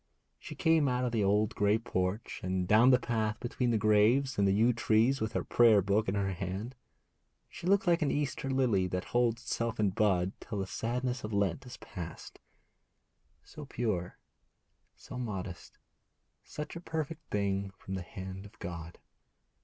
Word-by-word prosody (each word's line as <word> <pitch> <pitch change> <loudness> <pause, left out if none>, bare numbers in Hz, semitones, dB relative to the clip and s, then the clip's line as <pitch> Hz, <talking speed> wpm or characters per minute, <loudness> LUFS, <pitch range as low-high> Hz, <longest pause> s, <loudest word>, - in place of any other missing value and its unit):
She - - -9
came 160 -3 +3
out 125 0 0
of 125 - -1
the 110 -3 +1
old 105 +2 +2
grey 105 +1 +2
porch 95 -2 -3
and 90 0 -1
down 110 +5 +6
the 125 - +7
path 110 -3 -1
between 125 0 -1
the 115 - +2
graves 110 +5 +3
and 100 - +4
the - - +4
yew 115 +5 +4
trees 115 +3 +2
with 110 0 -2
her - - -1
prayer 115 -3 +5
book 100 +3 +1
in 95 - -1
her 100 -1 0
hand. 95 +6 -4 0.8
She 170 - -7
looked 200 +3 +3
like 170 -1 +3
an 150 - +2
Easter 145 -2 -2
lily 120 -9 +2
that 90 0 -3
holds 120 -1 +2
itself 115 -1 -2
in 105 -2 +2
bud 95 -3 +2
till 110 - -6
the 95 - -1
sadness 125 +5 -2
of 110 0 -5
Lent 100 +4 0
is 125 - -9
past, 85 -4 -9 1.0
so 150 - -10
pure, 105 -10 -3 0.8
so 125 - -9
modest, 95 -6 -6 0.7
such 150 +2 -7
a 170 - -6
perfect 160 -1 -4
thing 100 -1 -1
from 95 - -8
the 95 - -3
hand 95 +3 -8
of 110 +3 -21
God. 85 -2 -7
110 Hz, 175 wpm, -31 LUFS, 95-125 Hz, 1.0 s, the